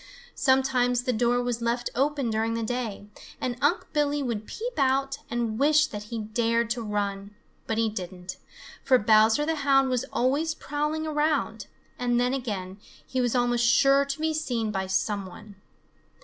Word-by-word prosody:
Sometimes 255 -2 +2
the 255 -1 0
door 245 +2 +1
was 240 -1 -2
left 235 +1 -1
open 275 -2 0
during 225 +1 0
the 230 - -2
day, 225 -3 -3 0.3
and 250 -1 -2
Unc' 300 +5 +2
Billy 290 -1 +1
would 220 -4 -3
peep 485 +3 -5
out 270 +1 +1
and 235 -2 -2
wish 305 +2 +5
that 210 -5 -7
he 230 +2 -5
dared 230 +1 0
to 240 0 -1
run. 205 -1 -3 0.3
But 225 - -1
he 225 0 +2
didn't, 185 -3 -6 0.5
for 260 -2 +5
Bowser 220 +5 +4
the 320 0 -1
Hound 275 -2 +3
was 250 0 0
always 290 +6 +1
prowling 300 +2 -2
around, 295 -8 -1 0.3
and 245 -1 +1
then 250 +1 +1
again 200 -7 -4 0.3
he 260 - -1
was 245 0 0
almost 240 -1 +2
sure 275 +2 +5
to 280 +1 -4
be 315 0 0
seen 245 -8 -2
by 190 -2 -2
some 195 +1 -1
one. 200 +3 -12
245 Hz, 170 wpm, -26 LUFS, 220-275 Hz, 0.5 s, wish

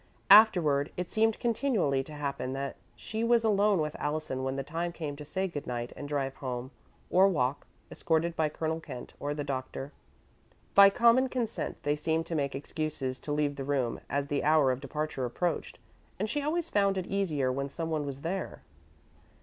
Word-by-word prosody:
Afterward 160 -9 +6
it 180 -1 -3
seemed 220 0 +2
continually 220 - +1
to 155 - -10
happen 140 -3 -3
that 135 +1 -4 0.2
she 220 +1 -4
was 230 0 +4
alone 205 -2 +3
with 150 -1 -2
Allison 150 -3 -2
when 130 0 -1
the 135 - -2
time 165 +4 -3
came 155 -4 -5
to 150 - -8
say 190 +6 -2
good 150 -5 -6
night 120 -1 -4
and 145 - -7
drive 135 -2 -1
home, 130 -1 -4 0.4
or 190 +2 +6
walk, 140 -7 0 0.2
escorted 165 +1 0
by 155 -2 +1
Colonel 160 +1 -2
Kent 130 -6 -9
or 145 +1 -2
the 145 - -3
Doctor. 135 0 -4 0.8
By 200 0 +9
common 235 +5 +4
consent, 235 -3 -2
they 145 0 +1
seemed 160 +2 0
to 170 - -5
make 140 -3 -1
excuses 140 -2 -3
to 150 - -6
leave 145 -1 0
the 135 - -3
room 130 -4 -1
as 140 +1 0
the 145 0 -1
hour 150 -3 +4
of 130 +1 -3
departure 150 0 -3
approached, 160 +7 -2 0.4
and 210 - -1
she 290 +7 -1
always 325 +3 0
found 200 -5 +2
it 185 - -2
easier 160 -10 0
when 140 +2 -2
someone 160 0 -2
was 140 -1 -6
there. 185 +5 -4
150 Hz, 185 wpm, -30 LUFS, 140-190 Hz, 0.8 s, By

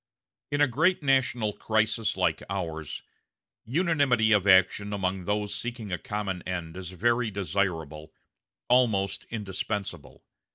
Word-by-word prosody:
In 145 0 0
a 145 - +6
great 160 +8 +2
national 125 -6 +2
crisis 110 0 0
like - - +1
ours, 80 -5 -4 0.6
unanimity 140 -6 +2
of 105 -2 +3
action 95 +2 +4
among 95 -2 -2
those 105 0 -1
seeking 120 -2 -5
a 90 - -2
common 100 -3 -3
end 85 -3 -5
is 95 -2 -6
very 115 +5 +1
desirable 80 -6 -2 0.6
almost 100 -6 +2
indispensable. 100 -5 -5
105 Hz, 120 wpm, -27 LUFS, 95-120 Hz, 0.6 s, a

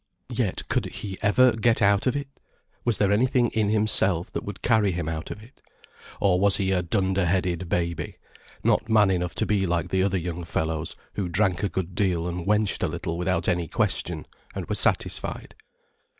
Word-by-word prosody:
Yet - - -1
could - - 0
he 95 -2 -7
ever 125 +4 +5
get 115 +1 +2
out 100 +2 +3
of 130 - +2
it? 140 -1 -3 0.6
Was 120 -3 +1
there 100 -1 +2
anything 125 +3 +3
in 110 -2 0
himself 100 -5 +2
that - - -4
would 100 -2 -8
carry 110 -4 +3
him 85 -2 -3
out 80 0 -4
of 105 - -7
it? 120 +5 -19 0.6
Or 90 -3 +3
was 100 0 +3
he 95 -1 0
a 90 -1 +2
dunderheaded 90 -1 0
baby, 85 -1 -2 0.5
not 110 - +2
man 105 -3 +5
enough 90 -1 -1
to - - 0
be 100 -3 +1
like 85 +1 -1
the 95 +1 +1
other 95 0 +1
young 90 0 -4
fellows 80 -1 -2 0.2
who 95 -3 -2
drank 95 0 +1
a 100 - 0
good 90 +1 -3
deal 90 -3 0
and 90 +1 -4
wenched 105 0 +1
a - - +2
little 85 - -4
without 90 0 -1
any 85 -2 +1
question, - - -1 0.3
and - - -4
were - - -1
satisfied. - - -1
95 Hz, 190 wpm, -25 LUFS, 85-105 Hz, 0.6 s, ever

